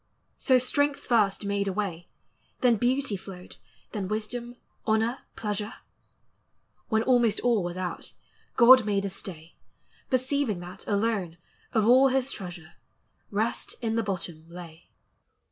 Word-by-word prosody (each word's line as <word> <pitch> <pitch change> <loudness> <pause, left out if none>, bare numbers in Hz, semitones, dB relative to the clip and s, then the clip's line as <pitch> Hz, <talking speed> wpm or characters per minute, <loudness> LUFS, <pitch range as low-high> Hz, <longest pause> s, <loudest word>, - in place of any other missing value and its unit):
277 260 -2 +5
So 250 - -1
strength 285 +2 +1
first 210 -4 +2
made 200 0 0
a 195 - -1
way; 180 -4 -3 0.5
Then 240 -3 +4
beauty 250 0 +1
flowed, 185 -1 -10 0.3
then 200 -3 -3
wisdom, 235 +4 -4 0.3
honor, 225 +3 +2 0.2
pleasure: 210 -1 -3 1.1
When 220 0 +2
almost 240 -4 +3
all 235 -5 +2
was 175 +1 -4
out, 185 -1 -5 0.4
God 255 +1 +8
made 200 -2 0
a 195 - -3
stay, 170 -4 -9 0.5
Perceiving 255 -5 0
that; 180 +2 -10
alone, 200 -5 0 0.3
of 220 -2 +2
all 255 +4 +7
his 265 0 0
treasure, 175 -5 -8 0.6
Rest 215 +3 -2
in 225 -1 -1
the 230 - +2
bottom 175 -6 -5
lay. 170 -1 -11
210 Hz, 135 wpm, -27 LUFS, 185-240 Hz, 1.1 s, God